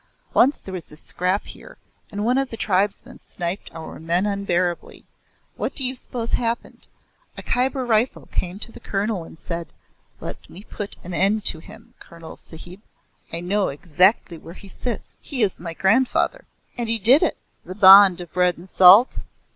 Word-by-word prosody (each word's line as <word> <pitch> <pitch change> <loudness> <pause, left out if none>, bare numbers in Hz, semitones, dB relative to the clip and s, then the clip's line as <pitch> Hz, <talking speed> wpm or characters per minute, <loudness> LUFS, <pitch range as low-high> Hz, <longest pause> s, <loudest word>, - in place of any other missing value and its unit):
Once 275 +4 +4
there 190 - -10
was 175 -4 -8
a - - -11
scrap 180 +5 -2
here - - -12 0.3
and 205 +1 -3
one 250 +3 +2
of 270 -1 -2
the 225 - -8
tribesmen 200 -1 -1
sniped 175 +2 -6
our 160 -1 -9
men 170 +4 0
unbearably. 185 -4 -2 0.5
What - - -3
do 275 - +1
you 255 0 +2
suppose 240 -2 -5
happened? 235 0 -3 0.5
A - - -8
Khyber 255 +1 -1
Rifle 230 +1 0
came 180 +1 -3
to 230 - -7
the - - -13
Colonel 200 -2 -2
and 165 - -14
said, 170 +1 -6 0.5
'Let - - -9
me 190 +4 -12
put 205 -1 -6
an 180 0 -7
end 200 +4 +1
to 160 - -2
him, 220 +6 -15
Colonel 165 -1 -12
Sahib. 175 +4 -13 0.5
I 165 - -4
know 195 +3 0
exactly 175 +4 +1
where 165 +3 -12
he 195 - -12
sits. 240 +3 -6
He 260 -6 -2
is 195 - -1
my 165 -1 -7
grandfather.' 255 - +1 0.3
And 235 -2 -2
he 230 - +4
did 240 +8 +6
it!" - - +1 0.3
"The 185 - -9
bond 195 -2 +8
of 175 - -11
bread 180 -1 +1
and 175 +3 -13
salt?" 190 +6 +6
195 Hz, 180 wpm, -22 LUFS, 175-225 Hz, 0.5 s, bond